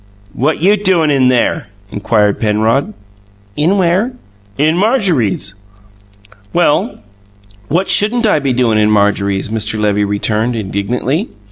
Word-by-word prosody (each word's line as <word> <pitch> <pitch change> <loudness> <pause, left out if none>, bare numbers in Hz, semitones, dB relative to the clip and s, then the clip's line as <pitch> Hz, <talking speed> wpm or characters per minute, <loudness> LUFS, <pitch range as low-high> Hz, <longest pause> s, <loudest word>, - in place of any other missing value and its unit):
"What 150 +5 -1
you 205 +3 +4
doin' 185 -6 +2
in 135 -2 +3
there?" 125 -5 0 0.2
inquired 105 -1 0
Penrod. 110 +2 0 0.6
"In 170 +7 +1
where?" 190 +7 +1 0.4
"In 155 +3 +2
Marjorie's." 175 - 0 1.0
"Well, 175 +5 +1 0.7
what 180 - 0
shouldn't 230 +3 +2
I 205 -8 +2
be 140 -2 -1
doin' 120 -3 +1
in 105 0 +2
Marjorie's?" 100 -1 0
Mr. 110 0 -2
Levy 105 -1 +1
returned 105 +3 -1
indignantly. 120 - -2
125 Hz, 120 wpm, -14 LUFS, 105-175 Hz, 1.0 s, you